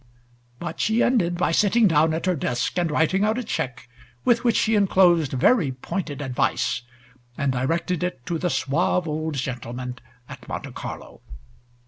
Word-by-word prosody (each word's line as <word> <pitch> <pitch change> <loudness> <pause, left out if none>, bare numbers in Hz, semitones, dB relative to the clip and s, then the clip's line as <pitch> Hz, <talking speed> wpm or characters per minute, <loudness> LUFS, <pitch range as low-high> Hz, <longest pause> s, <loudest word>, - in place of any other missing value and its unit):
But 170 +3 -6
she 220 +2 +2
ended 175 -9 +2
by 180 - +1
sitting 210 +5 +4
down 160 -1 +3
at 165 - -3
her 185 - +2
desk 125 -4 -2
and 175 -2 +1
writing 160 +6 +2
out 215 +2 +1
a 250 - -2
check, 130 - -4 0.4
with 235 0 +3
which 235 -2 +2
she 220 - +2
enclosed 180 -7 +4
very 150 - +3
pointed 145 +2 -4
advice, 125 -2 0 0.6
and 140 -1 +1
directed 165 +7 -1
it 180 -8 -3
to 170 -2 -2
the 180 - 0
suave 170 +4 0
old 155 0 -2
gentleman 125 -1 -5 0.3
at - - -11
Monte - - -5
Carlo. - - -8
165 Hz, 160 wpm, -24 LUFS, 135-190 Hz, 0.6 s, sitting